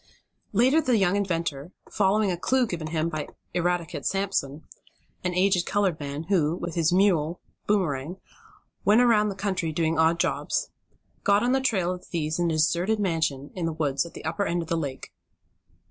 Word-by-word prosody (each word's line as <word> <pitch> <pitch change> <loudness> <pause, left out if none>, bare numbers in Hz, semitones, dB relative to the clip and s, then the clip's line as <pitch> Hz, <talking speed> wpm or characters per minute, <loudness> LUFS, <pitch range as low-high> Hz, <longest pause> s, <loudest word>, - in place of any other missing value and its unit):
Later 255 +9 +4
the 250 -6 +2
young 195 -2 +2
inventor, 170 -5 -2 0.2
following 205 0 +2
a - - 0
clue 255 +8 +1
given 170 -7 -4
him 160 0 -1
by 155 -3 -4 0.3
Eradicate 175 -1 -1
Sampson, 190 -7 -1 0.6
an 180 -1 -1
aged 185 -1 +2
colored 195 -6 +1
man, 145 +1 -5
who, 165 -3 +1
with 175 -1 -5
his 165 -1 +2
mule, 175 -4 +2 0.3
Boomerang, 175 -5 0 0.7
went 210 +3 +5
about 225 -4 +4
the 195 - -5
country 190 -5 -2
doing 160 0 0
odd 165 +1 +3
jobs, - - -1 0.5
got 200 +1 +3
on 245 - +2
the 265 0 +2
trail 190 -9 +1
of 180 - -7
the - - -19
thieves 155 -1 -2
in 175 -1 +2
a 160 - 0
deserted 175 +7 +1
mansion 160 -7 -1
in 175 -3 -2
the 165 - -2
woods 145 -4 0
at 170 - -11
the - - -9
upper 170 +5 -1
end 175 0 -1
of 160 - -12
the 170 - +1
lake. 140 -5 -5
175 Hz, 185 wpm, -26 LUFS, 160-200 Hz, 0.7 s, went